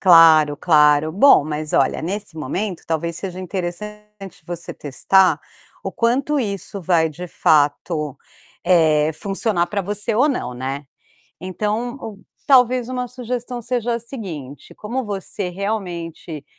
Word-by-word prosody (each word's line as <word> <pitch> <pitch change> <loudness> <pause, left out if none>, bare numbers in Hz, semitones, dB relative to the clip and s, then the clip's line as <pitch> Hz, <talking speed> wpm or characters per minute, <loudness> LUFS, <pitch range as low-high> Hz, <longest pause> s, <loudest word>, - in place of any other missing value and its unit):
Claro, 160 -5 +7
claro. 150 -1 +4
Bom, 205 - +6
mas 155 0 -4
olha, - - +2
nesse 195 0 -5
momento, 185 +4 -3
talvez 165 +1 -2
seja 185 0 -5
interessante 195 +2 -7
você 175 -1 -6
testar 160 +4 +2 0.4
o 195 - -3
quanto 265 +6 +1
isso 200 -3 -4
vai, 165 -2 +2
de 175 +4 -8
fato, 150 -1 +1 0.5
eh, 155 -3 +4
funcionar 195 0 0
pra 200 +1 -2
você 210 +3 -2
ou 260 +7 +4
não, 245 - -2
né. 135 +3 -4 0.6
Então, 215 +7 -3
um 210 -3 -8 0.2
talvez 250 -2 +4
uma 250 -1 -3
sugestão 245 0 -5
seja 240 0 -1
a - - -1
seguinte: 175 - -8
como 245 +5 -4
você 200 -2 -4
realmente 175 -5 -5
190 Hz, 130 wpm, -20 LUFS, 160-220 Hz, 0.6 s, Claro